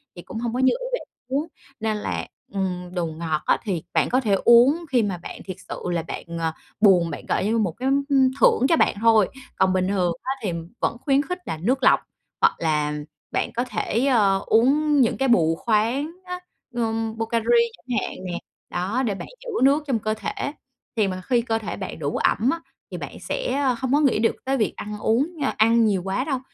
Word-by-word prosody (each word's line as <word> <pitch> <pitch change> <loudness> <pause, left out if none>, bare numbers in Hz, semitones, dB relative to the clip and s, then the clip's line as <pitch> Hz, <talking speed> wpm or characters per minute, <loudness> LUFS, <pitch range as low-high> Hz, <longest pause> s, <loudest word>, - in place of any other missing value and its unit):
Thì 175 - -8
cũng 220 - -8
hông 235 -1 -2
có 250 - -1
như 260 0 +4
ý - - -4
bạn - - -13 0.2
muốn, 280 +5 -1 0.3
nên 220 -1 -1
là, 85 - -3 0.3
ừm, 180 -2 -3
đồ 175 -2 -1
ngọt 160 -1 -2
á - - +3
thì 185 -7 -2
bạn - - +2
có 255 - +3
thể 215 -5 +1
uống 260 +8 +6
khi 250 -4 +3
mà 195 -3 -2
bạn 170 - -9
thiệt 185 -2 -7
sự - - -5
là 170 -2 -1
bạn, - - -6 0.2
ờ, 165 -1 0 0.3
buồn, 185 -5 +5
bạn - - -7
gọi - - 0
như 220 +2 +1
một 205 -6 +1
cái, 250 +10 -4 0.2
ừm, 265 -2 +5
thưởng 240 +1 +5
cho 330 - +5
bạn - - +3
thôi. 220 -4 +5 0.3
Còn 190 -1 +3
bình 185 0 +1
thường 185 -3 +1
á 260 - -2
thì 195 - 0 0.3
vẫn - - 0
khuyến 275 -1 +4
khích 360 +4 -4
là 160 - -3
nước 240 +12 0
lọc - - +6 0.4
hoặc - - +4
là 150 -2 +1 0.4
bạn - - -1
có 240 - +1
thể, 230 +3 0
ờ, 200 -7 +3
uống 285 +5 +4
những 235 - +2
cái 270 - +1
bù 165 -9 +4
khoáng 235 - 0
á, 360 0 -5 0.3
ừm, 225 -1 -1
Pocari 225 0 -1 0.3
chẳng 250 -3 -4
hạn - - -5
nè, 175 -1 -3 0.3
đó, 205 +9 -1
để 205 -4 -1
bạn - - -7 0.2
giữ - - -7
nước 280 +3 +4
trong 250 -5 +1
cơ 215 +1 -1
thể. 220 +5 -4 0.4
Thì 215 -3 +2
mà 185 -1 -4
khi 245 -2 +2
cơ 225 -1 -1
thể 215 - -5
bạn 190 -4 -6
đủ 145 -1 -2
ẩm 230 +4 +2
á, 335 - -2 0.3
thì - - -4
bạn - - -7
sẽ 395 - -2
không 260 +1 -1
có 290 - +5
nghĩ 275 -8 +3
được 225 - +2
tới 270 +1 +1
việc 220 - 0
ăn 210 0 -6
uống 265 +11 +1
nha 285 -3 -1
ăn 230 +1 +5
nhiều 200 -4 +1
quá 195 +6 -1
đâu, 275 -3 -1
225 Hz, 225 wpm, -23 LUFS, 190-260 Hz, 0.4 s, uống